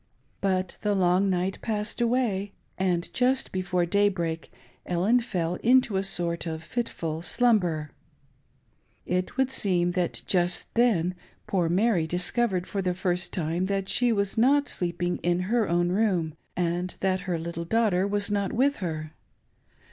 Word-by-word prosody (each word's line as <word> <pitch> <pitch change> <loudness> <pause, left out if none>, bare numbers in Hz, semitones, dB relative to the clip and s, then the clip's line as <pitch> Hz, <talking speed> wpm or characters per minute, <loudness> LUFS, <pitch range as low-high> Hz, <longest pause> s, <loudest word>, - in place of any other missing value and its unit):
But 185 -2 -1
the 205 -1 +1
long 185 +1 +3
night 185 +1 -1
passed 215 +1 -3
away, 230 -5 0 0.2
and 180 -2 0
just 255 +1 +1
before 180 -1 0
day 200 +4 +3
break 170 -4 -4 0.3
Ellen 190 +8 +2
fell 180 -7 -2
into 245 -3 +3
a 190 - +2
sort 175 -3 -1
of 160 -1 -4
fitful 165 -8 -3
slumber. 175 -9 +1 1.1
It 180 +6 -2
would 265 0 +2
seem 180 -7 +1
that 175 -1 -1
just 175 -1 +1
then 205 -8 +2 0.3
poor 175 -4 0
Mary 185 -2 +2
dis 175 +2 -1
covered 210 -7 0
for 200 - -3
the 180 -1 -1
iirst 180 -1 -1
time 175 +2 -2
that 195 -1 -2
she 240 +4 +2
was 200 -1 0
not 285 +4 +4
sleeping 175 0 -1
in 175 +1 0
her 235 -5 +2
own 175 +1 +2
room, 185 -6 +1 0.2
and 175 +1 -1
that 190 -1 +1
her 175 - 0
little 170 +1 -5
daughter 200 -2 +2
was 205 0 -1
not 200 -2 0
with 275 +4 +2
her. 155 -4 -4
185 Hz, 155 wpm, -26 LUFS, 175-210 Hz, 1.1 s, not